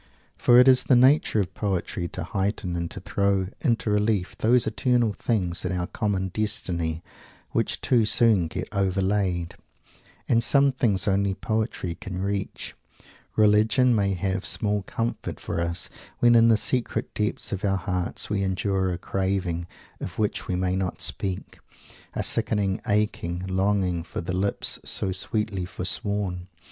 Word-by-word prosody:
For 120 - +5
it 125 +1 +7
is 130 -1 +5
the 130 - +5
nature 130 -2 +4
of 95 - -4
poetry 95 -3 -2
to - - -4
heighten 95 -2 -2
and 85 -1 -2
to 100 - -8
throw 100 -1 0
into 115 -6 +1
relief 105 -2 +1
those 120 +2 +3
eternal 120 -4 +1
things 90 -7 -1
in 90 - -2
our 90 -1 -1
common 100 -3 -2
destiny 85 -5 -2 0.5
which - - -1
too 120 -4 +3
soon 110 -6 +3
get - - -5
overlaid 95 -2 0 0.7
And 115 -1 +3
some 140 +3 +4
things 110 -8 +1
only 100 -1 +1
poetry 110 -4 -2
can 95 0 -7
reach 100 0 -3 0.6
Religion 110 +4 +4
may 100 -3 +1
have 95 +1 -2
small 105 -2 0
comfort 115 +4 -4
for - - -3
us 85 +1 -1 0.3
when 120 0 +5
in 115 0 +6
the 115 -2 +5
secret 125 +2 -1
depths 105 -1 -2
of 95 - -3
our 95 -1 +2
hearts 90 -1 -2
we 105 -2 -1
endure 95 0 0
a 90 - -2
craving 95 -2 -2 0.3
of 90 - -6
which 105 -1 -1
we 90 - -1
may 90 0 0
not 95 -1 -2
speak, 95 -2 -2 0.6
a - - -1
sickening 100 -2 0
aching 100 -4 0
longing 95 -2 0
for 80 - -6
"the 90 +2 -4
lips 95 +2 -1
so 95 - -2
sweetly 100 0 -2
forsworn." 90 0 -1
100 Hz, 155 wpm, -25 LUFS, 90-110 Hz, 0.7 s, it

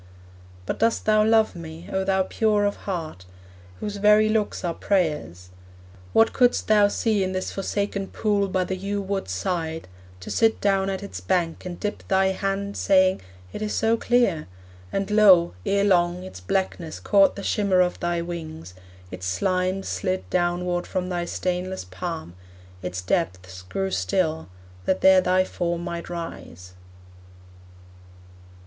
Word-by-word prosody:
But - - -3
dost 230 +1 +1
thou 215 0 +4
love 220 -1 +3
me, 165 0 -9
O 190 - +1
thou 190 0 +2
pure 210 +1 +1
of 205 - 0
heart, 160 - -5 0.5
Whose 205 -1 -4
very 210 +1 +5
looks 215 -3 -1
are 170 - -1
prayers? 150 - -1 0.6
What 225 - +4
couldst 245 -1 +2
thou 210 -1 +5
see 210 -1 0
In 185 0 -2
this 185 0 -3
forsaken 200 0 -2
pool 205 -2 0
by 185 -1 0
the 190 - -3
yew 200 +2 -3
wood's 195 - -3
side, 160 - -3 0.3
To - - -7
sit 225 -1 +2
down 195 -1 +1
at 195 0 -3
its 200 - -7
bank, 175 -2 -1
and 175 -1 -7
dip 210 -1 -3
thy 190 0 +3
hand, 195 +1 -2
Saying, 190 -1 +3 0.3
'It - - -6
is 210 0 -2
so 225 +1 +2
clear!' 230 -9 +1 0.4
and 195 +1 -2
lo! 195 -5 +6
ere 200 0 +2
long, 180 -2 +2
Its 140 - -9
blackness 165 - -2
caught 200 -2 +4
the 200 - -7
shimmer 200 -3 +2
of 180 0 0
thy 175 0 -1
wings, 160 - -7 0.4
Its 95 0 -5
slimes 185 - 0
slid 185 -1 -2
downward 175 0 0
from 180 0 -2
thy 175 -1 -2
stainless 180 +1 -3
palm, 90 -2 -6 0.5
Its 90 0 -4
depths 90 +1 -2
grew 190 - -3
still, 160 - -1 0.4
that 190 - +1
there 190 -1 +7
thy 185 +1 +3
form 175 -2 -3
might 170 -1 -5
rise. 90 - -8
185 Hz, 155 wpm, -24 LUFS, 170-200 Hz, 0.6 s, there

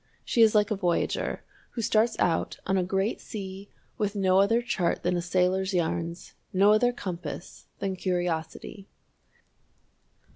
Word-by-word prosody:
She 235 - +2
is 220 -1 +6
like 210 0 +3
a - - +2
voyager 180 -3 -1 0.3
who 230 - -1
starts 220 +2 +2
out 165 -2 0
on 190 - +1
a 190 - +3
great 195 +4 -1
sea 195 -1 -7 0.3
with 205 0 -1
no 190 -1 +3
other 225 +4 +3
chart 185 -8 -1
than 180 0 +1
a 175 - 0
sailor's 185 +2 +1
yarns, 170 0 -2 0.2
no 200 +2 +5
other 245 +3 +3
compass 185 -6 -7
than 195 -1 -2
curiosity. 180 +1 -3
190 Hz, 145 wpm, -27 LUFS, 180-210 Hz, 0.3 s, is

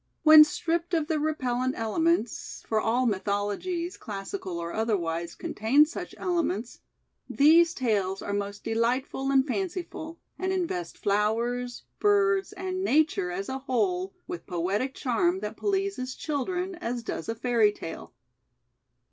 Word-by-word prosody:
When 310 -1 +10
stripped 340 +3 -1
of 320 -2 +1
their 310 0 0
repellent 260 -4 -1
elements, 240 +2 0
for 220 -1 +1
all 240 +4 +1
mythologies, 210 - -1
classical 195 -3 -5
or 170 0 -4
otherwise, 170 -7 -1
contain 265 +8 +3
such 315 - -7
elements, 280 - -1 0.3
— - - -51 0.2
these 330 +4 +5
tales 200 -6 0
are 200 - -3
most 200 0 -3
delightful 245 +4 0
and 270 -1 +4
fanciful, 340 0 -4 0.2
and 375 0 -1
invest 330 - -2
flowers, 235 +4 0 0.2
birds, 405 -1 +3
and 375 -1 -4
nature 295 - +2
as 195 +3 -4
a 265 0 -3
whole 195 -8 -1
with 170 -1 -7
poetic 195 +10 -1
charm 345 +9 +1
that - - -4
pleases 390 -10 -1
children 355 +6 -2
as 240 -5 -3
does 195 -3 -5
a 225 - -1
fairy 230 -3 +3
tale. 165 -5 -8
255 Hz, 135 wpm, -27 LUFS, 205-335 Hz, 0.3 s, When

